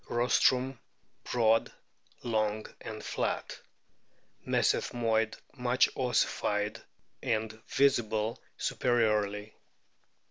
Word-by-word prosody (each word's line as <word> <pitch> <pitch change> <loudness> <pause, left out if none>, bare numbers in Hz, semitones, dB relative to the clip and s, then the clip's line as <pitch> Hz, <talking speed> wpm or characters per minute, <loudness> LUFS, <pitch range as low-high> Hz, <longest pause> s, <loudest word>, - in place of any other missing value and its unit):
Rostrum 125 +1 +2 0.5
broad, 115 -2 +2 0.5
long, 110 -2 0 0.2
and 110 -1 -7
flat. - - -2 0.9
Mesethmoid 115 -2 +1 0.2
much 125 -2 +2
ossified 105 -4 0 0.4
and 110 -1 -1
visible 115 -5 +1 0.2
superiorly. 105 -3 +1
115 Hz, 65 wpm, -30 LUFS, 110-120 Hz, 0.9 s, Rostrum